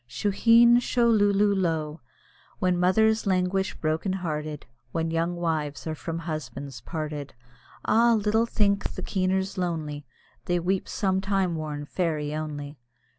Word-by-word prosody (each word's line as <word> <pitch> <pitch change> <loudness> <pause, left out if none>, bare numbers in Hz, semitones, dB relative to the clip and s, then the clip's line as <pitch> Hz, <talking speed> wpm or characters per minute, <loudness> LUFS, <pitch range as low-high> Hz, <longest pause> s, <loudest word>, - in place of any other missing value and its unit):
Shuheen, 230 - +5
sho, 240 -1 +2
lulo 205 -1 +3
lo! 160 -4 -1 0.6
When 180 -1 +1
mothers 220 +4 +3
languish 190 +1 +1
broken 160 +4 -1
hearted, 155 -5 -4 0.3
When 165 +2 -1
young 165 +2 0
wives 160 -4 -2
are 160 - -2
from 165 +1 -5
husbands 145 -5 -6
parted, 150 -4 -5 0.5
Ah! 235 +2 +4
little 220 +2 +1
think 200 -3 +1
the - - -5
keeners 190 0 -1
lonely, 155 -4 -3 0.4
They 175 0 +1
weep 185 +2 -1
some 190 -2 0
time 195 -3 0
worn 150 -2 -4
fairy 150 -3 -2
only. 150 -2 -5
175 Hz, 130 wpm, -26 LUFS, 155-195 Hz, 0.6 s, Shuheen